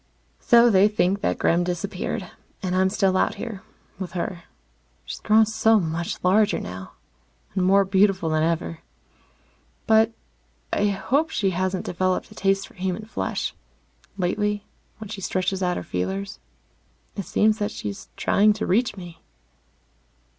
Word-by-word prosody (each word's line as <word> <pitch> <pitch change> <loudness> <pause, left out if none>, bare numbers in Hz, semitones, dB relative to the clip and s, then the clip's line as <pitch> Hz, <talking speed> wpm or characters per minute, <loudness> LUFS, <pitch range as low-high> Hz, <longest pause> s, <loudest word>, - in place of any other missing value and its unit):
So 235 -1 +6
they 195 0 +6
think 200 -2 +1
that - - 0
Gremm 170 +1 +2
disappeared. 185 +2 -3 0.3
And 185 -1 -1
I'm 190 0 +3
still 195 -2 +1
out - - +2
here 215 -5 -6 0.4
with 185 -3 -5
her. 175 -1 -4 0.6
She's - - -6
grown 220 +1 +4
so 220 0 +3
much 170 -1 -3
larger 205 +3 +3
now, 95 +1 -8 0.6
and 185 -1 0
more 195 +2 +4
beautiful 190 -2 +2
than 155 -1 +1
ever. 165 0 -1 1.1
But 220 +1 +4 0.6
I 205 - +2
hope 265 +10 0
she 195 -10 0
hasn't 185 +1 -1
developed 185 +1 -1
a - - -10
taste 195 0 0
for - - -19
human 190 +2 -3
flesh. 220 - -3 0.6
Lately, 205 +3 -1 0.3
when 220 -2 -9
she 200 -2 -6
stretches 185 +1 -1
out 180 -1 0
her - - -4
feelers, 95 +3 -3 0.8
it 200 - -4
seems 215 +1 +2
that 205 - 0
she's 100 -1 -7
trying 210 +1 +4
to 215 - -3
reach 215 +2 +1
me. 175 -3 -10
190 Hz, 145 wpm, -24 LUFS, 175-210 Hz, 1.1 s, So